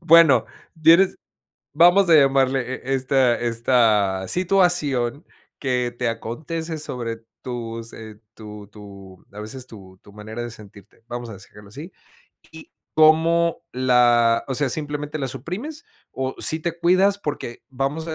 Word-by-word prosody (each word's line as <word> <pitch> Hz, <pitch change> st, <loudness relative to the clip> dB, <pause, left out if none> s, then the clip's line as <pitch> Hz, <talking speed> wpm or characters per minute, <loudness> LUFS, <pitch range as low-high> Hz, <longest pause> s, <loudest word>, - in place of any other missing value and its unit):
bueno, 165 Hz, -8 st, +6 dB, 0.4 s
tienes 170 Hz, +4 st, +5 dB, 0.6 s
vamos 175 Hz, +4 st, +5 dB
a -, -, +7 dB
llamarle, 135 Hz, -2 st, +4 dB, 0.2 s
e 135 Hz, -, -1 dB
esta 130 Hz, -2 st, +2 dB
esta 115 Hz, -5 st, +1 dB
situación, 170 Hz, -8 st, +1 dB, 0.3 s
que 125 Hz, -3 st, -1 dB
te 125 Hz, -, 0 dB
acontece 155 Hz, +8 st, -5 dB
sobre 120 Hz, -6 st, -5 dB, 0.2 s
tus 115 Hz, -2 st, -6 dB
eh, 110 Hz, -1 st, -11 dB
tu 105 Hz, -2 st, -11 dB
tu, 100 Hz, -3 st, -14 dB
a 105 Hz, -, -9 dB
veces, 125 Hz, +4 st, -8 dB
tu 95 Hz, -5 st, -14 dB
tu 100 Hz, -, -17 dB
manera 110 Hz, +3 st, -8 dB
de 120 Hz, -, -6 dB
sentirte. 105 Hz, -1 st, -16 dB
Vamos 120 Hz, -1 st, -6 dB
a 105 Hz, -, -9 dB
s 95 Hz, -, -15 dB
dejarlo 105 Hz, -1 st, -15 dB
así. 150 Hz, -, -10 dB, 0.6 s
Y 160 Hz, 0 st, -13 dB, 0.2 s
cómo 165 Hz, +2 st, +3 dB
la 120 Hz, -2 st, +3 dB
O 130 Hz, -, -2 dB
sea, 145 Hz, +1 st, 0 dB
¿simplemente 150 Hz, 0 st, -4 dB
la 135 Hz, -3 st, -3 dB
suprimes, 200 Hz, -, -7 dB, 0.3 s
o 130 Hz, 0 st, -3 dB
sí 160 Hz, -1 st, 0 dB
te 170 Hz, 0 st, -4 dB
cuidas? 185 Hz, +4 st, +3 dB
Porque 145 Hz, -9 st, -6 dB
vamos 135 Hz, +5 st, -3 dB
a 160 Hz, -, -3 dB
130 Hz, 145 wpm, -22 LUFS, 115-160 Hz, 0.6 s, a